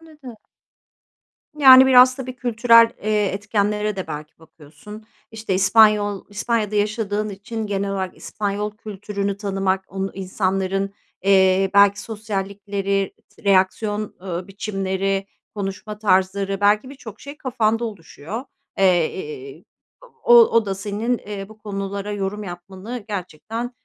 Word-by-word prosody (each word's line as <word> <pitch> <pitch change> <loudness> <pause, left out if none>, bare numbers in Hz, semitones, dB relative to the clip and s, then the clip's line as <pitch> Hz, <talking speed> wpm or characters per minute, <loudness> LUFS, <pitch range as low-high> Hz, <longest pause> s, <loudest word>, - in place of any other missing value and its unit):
Anladım. 300 -8 -13 1.2
Yani, 265 -3 +9
biraz, 255 0 +7
tabii, 255 -1 -7
kültürel, 230 -1 +5
eee, 210 -1 +1
etkenlere 205 +1 -1
de 190 - -4
belki 150 +1 -8
bakıyorsun. 160 +7 -14 0.3
İşte, 220 -3 -3
İspanyol 205 +1 +4
İspanya'da 215 0 -1
yaşadığın 210 0 -1
için 215 +2 -6
genel 200 0 -2
olarak 190 -2 -3
İspanyol 210 0 -4
kültürünü 200 -1 -4
tanımak, 195 -2 -1
onu 195 +1 -4
insanların, 195 +1 -2 0.3
eee, 190 -1 +4
belki 200 0 +5
sosyallikleri, 200 -2 -3
s - - -23
reaksiyon, 205 +2 +1
eee, 180 0 -5
biçimleri, 195 -1 -2 0.3
konuşma 205 +1 -5
tarzları 195 -1 +1
belki 210 +6 +2
birçok 245 -7 -11
şey 285 +1 -9
kafanda 235 -4 0
oluşuyor. 205 - -7 0.3
Eee, 390 - 0 0.6
o 480 0 +6
o 230 - +5
da 195 - -1
senin, 210 +5 -2
eee, 200 -2 -7
bu 220 - -15
konulara 200 -1 -5
yorum 205 +1 -3
yapmanı, 190 +5 -8
gerçekten, 210 +5 -5
205 Hz, 120 wpm, -21 LUFS, 195-220 Hz, 1.2 s, Yani